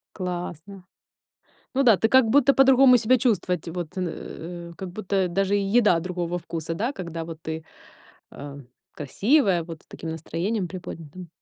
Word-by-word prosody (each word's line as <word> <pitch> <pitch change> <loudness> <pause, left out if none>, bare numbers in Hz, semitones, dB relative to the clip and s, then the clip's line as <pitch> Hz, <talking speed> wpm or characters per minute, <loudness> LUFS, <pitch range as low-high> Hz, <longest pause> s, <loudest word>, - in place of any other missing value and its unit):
Классно. 180 0 -6 0.9
Ну 275 - +3
да, 230 -6 +6
ты 225 - +1
как 260 -2 +5
будто 275 +2 +5
по-другому 265 -1 +6
себя 245 +3 +3
чувствовать. 180 - 0
Вот, 175 -1 -5
э, 170 -1 -6
как 190 -2 -6
будто 190 -1 -1
даже 195 +3 0
еда 200 -3 +3
другого 175 0 -3
вкуса, 165 -1 -5
да, 235 +10 -2
когда 170 - -6
вот 165 -1 -8
ты, 160 0 -5 0.7
а, 140 0 -9 0.3
красивая, 195 - +1
вот 165 -2 -9
с - - -30
таким 165 - -7
настроением 175 +5 -3
приподнятым? 175 -1 -9
180 Hz, 145 wpm, -24 LUFS, 165-215 Hz, 0.9 s, да